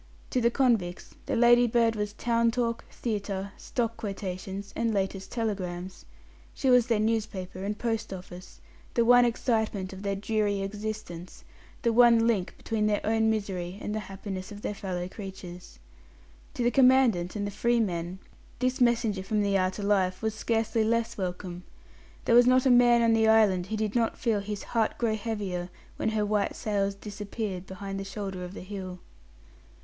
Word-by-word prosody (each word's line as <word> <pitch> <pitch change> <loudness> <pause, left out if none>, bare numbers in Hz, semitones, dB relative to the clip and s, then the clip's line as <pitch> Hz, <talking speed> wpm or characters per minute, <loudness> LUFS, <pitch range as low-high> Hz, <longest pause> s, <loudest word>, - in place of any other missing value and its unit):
To 250 - +1
the 235 - +4
convicts 230 -9 0
the - - 0
Ladybird 240 -1 +4
was 210 -1 -3
town 235 +1 +1
talk, 230 -1 -1
theatre, 200 -3 -3
stock 230 -1 -3
quotations, 195 -2 -5
and 230 -1 0
latest 195 -1 -2
telegrams. 185 -5 -4 0.5
She 265 - +2
was 250 -1 +5
their 230 -3 +2
newspaper 210 -4 -2
and 205 +1 -2
post 225 -2 -2
office, 180 -1 -10 0.3
the 235 -2 +3
one 245 +1 +7
excitement 220 -5 -1
of 190 - -9
their 200 -1 -1
dreary 205 0 0
existence, 205 -3 -6 0.4
the 235 -2 +2
one 235 -1 +6
link 210 -6 0
between 215 -1 -1
their 210 -1 0
own 220 0 +2
misery 195 -4 -2
and 210 - -4
the 215 - -1
happiness 195 0 -6
of 205 0 -9
their - - -2
fellow 180 -3 -4
creatures. 185 - -9 0.8
To 245 - -1
the 240 - +3
Commandant 250 -10 +4
and 205 -1 -2
the 205 - -3
"free 235 +4 +1
men" 175 -4 -2 0.4
this 255 0 -1
messenger 235 -5 +2
from 210 +2 0
the 200 -1 +1
outer 185 +2 0
life 190 -1 +1
was 220 -1 0
scarcely 225 0 0
less 230 +1 0
welcome. 180 -1 -4 0.6
There - - +3
was 245 +1 +7
not 255 +1 +4
a 260 - +5
man 240 -1 +6
on 230 -1 +4
the 225 0 +3
island 205 -5 +4
who 215 +2 -3
did 215 -1 -1
not 230 -2 +1
feel 225 -4 +1
his 205 0 -5
heart 225 -2 0
grow 225 -2 +1
heavier 200 -5 -3 0.3
when - - 0
her 215 -1 0
white 205 -1 0
sails 200 -2 -1
disappeared 205 -2 -5
behind 195 +1 -6
the - - -4
shoulder 195 -2 -5
of 180 +2 -8
the - - -7
hill. 185 -1 -6
210 Hz, 175 wpm, -28 LUFS, 190-230 Hz, 0.8 s, one